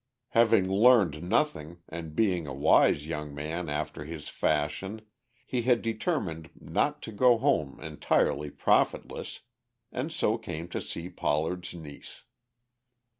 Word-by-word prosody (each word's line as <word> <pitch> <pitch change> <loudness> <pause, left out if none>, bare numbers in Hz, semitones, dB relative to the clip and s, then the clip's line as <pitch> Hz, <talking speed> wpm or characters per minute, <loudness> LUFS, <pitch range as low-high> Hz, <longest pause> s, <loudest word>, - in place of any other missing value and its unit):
Having 115 -4 +4
learned 100 -6 +4
nothing, 85 - -1
and 80 -2 -7
being 90 -7 +1
a 70 - -5
wise 75 +1 +4
young 75 -2 -5
man 80 +3 -4
after 75 0 -3
his 75 -1 -7
fashion, 85 +8 -1 0.4
he 125 -2 -1
had 120 -1 +2
determined 110 - -2
not - - -1
to - - -6
go 120 +3 +4
home 80 - 0
entirely 75 -1 0
profitless, - - 0 0.5
and 130 +6 -3
so 115 -8 +1
came 85 -6 -6
to - - -3
see 85 +1 -5
Pollard's 90 +2 -2
niece. 75 -4 -11
85 Hz, 125 wpm, -28 LUFS, 75-110 Hz, 0.5 s, Having